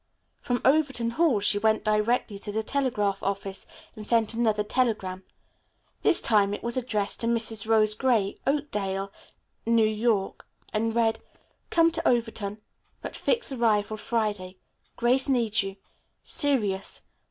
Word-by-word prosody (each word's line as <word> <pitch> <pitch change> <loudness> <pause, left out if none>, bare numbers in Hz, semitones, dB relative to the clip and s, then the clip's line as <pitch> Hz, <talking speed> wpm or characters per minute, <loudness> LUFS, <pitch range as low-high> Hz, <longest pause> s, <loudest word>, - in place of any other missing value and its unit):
From 245 -2 -2
Overton 270 -5 +2
Hall 275 -6 +2
she 205 0 +3
went 220 0 +1
directly 215 0 0
to 205 - -7
the 220 +1 -2
telegraph 215 -7 -1
office 195 0 -4 0.3
and 215 - -8
sent 225 0 +2
another 220 -2 +1
telegram. 210 -5 -1 0.8
This - - +4
time 205 -2 +3
it - - -11
was 235 0 -1
addressed 220 -5 -1
to 230 - 0
Mrs. 225 -2 0
Rose 215 -1 +4
Gray, 215 -4 0
Oakdale, 200 -9 -2 0.6
N.Y., 220 -2 +2 0.4
and 225 +1 -1
read: 225 -1 +1 0.5
"Come 330 0 +4
to 330 - -1
Overton, 225 -4 -1 0.4
but - - -5
fix 480 - +1
arrival 220 -4 +1
Friday. 210 -5 -2 0.4
Grace 255 +3 +2
needs 230 -4 +2
you. 195 -1 -5 0.5
Serious. 215 -10 0
220 Hz, 130 wpm, -26 LUFS, 205-240 Hz, 0.8 s, This